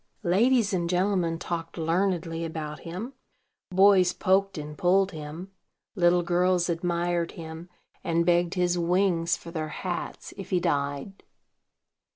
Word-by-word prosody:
Ladies 220 +4 +3
and 175 -2 0
gentlemen 180 -2 +1
talked 165 0 -5
learnedly 165 0 0
about 155 -2 -5
him; 185 +10 -6 0.6
boys 190 -1 +5
poked 195 0 +1
and 150 0 -6
pulled 190 +4 +2
him; 160 +4 -8 0.4
little 175 -3 +3
girls 180 0 +2
admired 170 0 -1
him, 165 +1 -9 0.3
and 170 0 +1
begged 175 +1 +2
his 180 -1 +1
wings 175 0 +1
for 170 - -10
their 155 -2 -3
hats, 175 +2 -5
if 195 - -8
he 180 - +2
died. 145 +5 -2
175 Hz, 130 wpm, -27 LUFS, 165-185 Hz, 0.6 s, boys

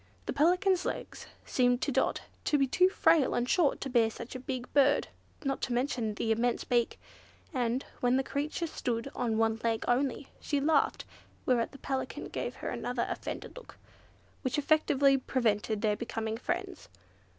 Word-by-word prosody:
The - - -2
Pelican's 360 +4 +3
legs - - -5 0.2
seemed 245 -1 +2
to - - 0
Dot - - +1 0.2
to 295 - +3
be 275 - +3
too 365 +8 +4
frail 320 -6 +3
and 240 0 0
short 320 -1 +2
to - - -2
bear 230 -3 +4
such 235 +2 -8
a 255 - -5
big 255 -1 -5
bird, 285 0 +4 0.4
not 275 0 -1
to 245 - -1
mention 240 -4 -1
the 225 - -1
immense 230 +2 +1
beak; 240 -2 0 0.5
and, 245 0 0
when 245 +1 +3
the 265 - +1
creature 295 +5 -2
stood 245 -4 -3
on 230 -3 -1
one 225 0 +1
leg 225 -1 0
only, 265 +2 0
she 290 - -1
laughed; 290 +1 +2 0.4
whereat 240 -3 +2
the 275 - -11
Pelican 270 -1 -4
gave - - -4
her - - -5
another - - -2
offended - - -5
look, - - -12 0.6
which 260 0 -1
effectually 285 -2 +3
prevented 220 -4 0
their 210 -1 +3
becoming 225 -1 -3
friends. 355 - -4
255 Hz, 170 wpm, -30 LUFS, 235-285 Hz, 0.6 s, too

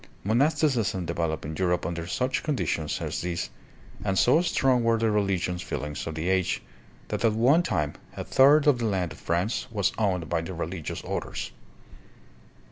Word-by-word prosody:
Monasticism 115 - +1
developed 85 -2 -2
in 80 +2 -5
Europe 90 -1 0
under 85 0 -3
such 125 +7 -1
conditions 85 - -1
as - - -3
these, 85 -1 -3 0.5
and 95 0 0
so 140 - +5
strong 130 -7 +2
were 115 0 +3
the 110 -1 +1
religious 95 -4 0
feelings 75 -1 -4
of 80 - -4
the 80 +2 -3
age 95 -1 +1 0.5
that - - -2
at 115 -2 +4
one 130 +10 +4
time 75 - -1 0.2
a - - -3
third 140 +3 +5
of 145 -5 +4
the 115 - -1
land 95 -5 0
of - - -10
France 90 +7 -1
was 105 -5 +1
owned 90 -6 0
by 85 -1 0
the 85 +3 -6
re 85 - -2
ligious - - -5
orders. - - -4
95 Hz, 175 wpm, -27 LUFS, 85-120 Hz, 0.5 s, so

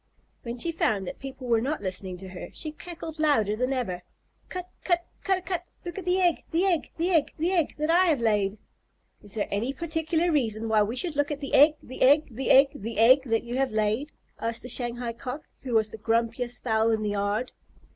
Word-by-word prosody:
When 235 0 -5
she 335 +8 0
found 210 -11 0
that - - -7
people 270 -1 -8
were 230 -2 +2
not 290 +6 -1
listening 185 -1 -4
to 190 +1 -9
her, 180 -1 -8
she 310 - -5
cackled 325 0 -8
louder 250 -10 +3
than 255 +4 -1
ever, 225 -10 -2 0.5
"Cut 365 -1 -5 0.2
cut 345 -1 +1 0.2
ca 390 - +2
dah 370 - -5
cut! 360 -1 -4 0.2
Look 350 +2 -5
at 370 - -8
the 365 +1 +2
egg 350 -3 +2
the 340 +4 +2
egg 350 -5 +1
the 345 +3 +1
egg 320 -5 +2
the 335 +4 0
egg 340 -5 +1
that 305 +2 +1
I 360 +2 +5
have 305 -6 +3
laid." 210 -3 +1 0.6
"Is 205 0 -5
there 210 - -1
any 230 +7 -1
particular 320 +2 0
reason 225 -7 0
why 220 -1 +4
we 210 +3 0
should 310 +4 -2
look 290 0 +1
at 295 -1 -3
the 275 - -6
egg 300 +2 +7
the 255 - -10
egg 290 +4 +5
the 255 +4 -3
egg 275 +1 +7
the 225 +1 -6
egg 255 +5 +6
that 225 -3 +1
you 240 +1 -4
have 270 -2 +1
laid?" 215 +7 0 0.3
asked 230 0 -2
the 250 - -6
Shanghai 240 -1 -2
Cock, 255 +5 -6 0.2
who 250 -3 -3
was 220 -1 +2
the 220 - -9
grumpiest 230 +2 -1
fowl 220 -1 +2
in 220 -1 +1
the 210 - -1
yard. 205 +4 -1
255 Hz, 225 wpm, -27 LUFS, 220-315 Hz, 0.6 s, egg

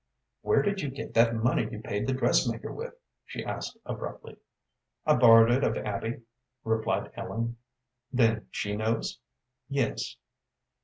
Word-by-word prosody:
"Where 430 - +3
did 200 -1 0
you 145 - -2
get 135 +2 -7
that 115 0 +4
money 115 +3 +1
you 105 - -6
paid 105 +1 -3
the 135 - +1
dressmaker 130 - +1
with?" 485 +1 -6 0.3
she - - -6
asked, - - -4
abruptly. - - -6 0.7
"I 150 - +5
borrowed 115 -3 +8
it 130 +3 +3
of 110 - +1
Abby," 110 +4 -3 0.4
replied 110 0 0
Ellen. 115 +1 -3 0.5
"Then 115 -3 +2
she 105 0 -2
knows?" 110 +2 -1 0.5
"Yes." 140 -4 -1
115 Hz, 140 wpm, -29 LUFS, 110-130 Hz, 0.7 s, borrowed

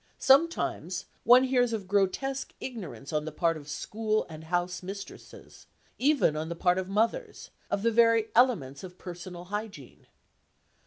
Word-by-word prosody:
Sometimes 265 - +2 0.2
one 245 +2 +8
hears 250 -2 +2
of 205 -4 -4
grotesque 205 +8 0
ignorance 190 - -7
on 150 0 0
the 155 - -4
part 165 +2 +1
of 150 -1 -10
school 215 +7 -1
and 160 0 -10
house 175 +2 -1
mistresses, 195 +2 -10 0.3
even 280 - +3
on 155 +1 -3
the 170 - -4
part 180 +2 +2
of 190 0 -5
mothers, 230 - -1 0.2
of 200 - -1
the 230 - +3
very 230 -1 +4
elements 195 - +2
of 180 -1 -10
personal 175 0 -8
hygiene. 205 - -7
195 Hz, 150 wpm, -28 LUFS, 175-235 Hz, 0.3 s, one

